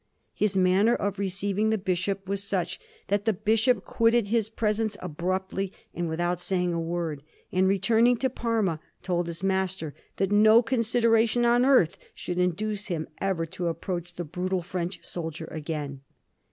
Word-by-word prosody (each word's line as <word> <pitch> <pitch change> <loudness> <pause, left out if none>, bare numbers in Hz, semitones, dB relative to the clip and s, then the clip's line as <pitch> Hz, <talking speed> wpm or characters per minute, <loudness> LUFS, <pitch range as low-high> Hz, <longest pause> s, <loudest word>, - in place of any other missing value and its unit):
His 205 -2 0
manner 190 +5 +4
of 200 -1 -2
receiving 200 +2 0
the 220 - +2
bishop 190 +1 -2
was 200 0 -1
such 190 -2 -1 0.3
that 205 +1 +1
the 220 - +3
bishop 220 +2 +2
quitted 230 -2 +2
his 225 -1 +1
presence 215 -1 0
abruptly 185 +3 -2 0.2
and 175 -1 -2
without 175 +2 -1
saying 180 -2 +1
a 170 - -1
word, 165 -3 -3 0.3
and 190 +1 +3
returning 230 +5 +3
to 260 +2 +1
Parma, 225 -9 0 0.2
told 175 -1 0
his 170 +2 -5
master 190 -5 -1 0.2
that 195 0 0
no 215 +3 +6
consideration 230 0 +3
on 240 +1 +4
earth 255 - +4 0.2
should 180 0 -4
induce 200 +4 -1
him 165 -5 -3
ever 190 -4 0
to 175 +2 -4
approach 175 +1 -4
the 175 - -4
brutal 180 +3 -2
French 175 0 -4
soldier 160 -2 -5
again. 150 -3 -5
190 Hz, 155 wpm, -27 LUFS, 175-215 Hz, 0.3 s, no